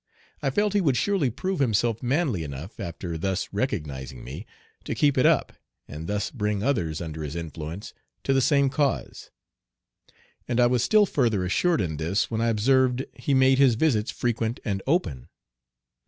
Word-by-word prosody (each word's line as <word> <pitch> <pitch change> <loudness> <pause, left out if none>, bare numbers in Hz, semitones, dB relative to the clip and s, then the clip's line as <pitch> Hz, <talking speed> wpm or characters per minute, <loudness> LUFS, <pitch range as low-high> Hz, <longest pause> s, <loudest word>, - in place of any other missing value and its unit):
I 140 - +1
felt 205 +8 +1
he 205 - +3
would 140 -8 +2
surely 185 -2 +1
prove 170 - -3
himself 115 -3 +1
manly 130 - 0
enough, 75 +8 -8
after 85 -3 -5
thus 95 +2 -1
recognizing 75 - -3
me, 75 - -8 0.4
to - - -3
keep 145 -2 +3
it 130 - +4
up, - - +2 0.3
and 75 +3 -7
thus 105 +1 -2
bring 105 -4 -2
others 90 - 0
under 80 -2 -5
his 75 0 -5
influence 80 +3 -6 0.3
to 135 - +1
the 135 - +3
same 140 0 +3
cause. 145 -1 -1 1.2
And 120 0 0
I 120 - +6
was 120 -1 +2
still 215 +5 +5
further 115 - +1
assured 165 - +2
in 80 -4 -2
this 85 +9 -1
when 110 0 -1
I 115 - +2
observed 130 +3 +2
he 130 +4 -1
made 130 0 +4
his 130 -4 +5
visits 115 -5 +1
frequent 115 0 -1
and 100 -2 -1
open. 80 - 0
115 Hz, 170 wpm, -25 LUFS, 85-135 Hz, 1.2 s, I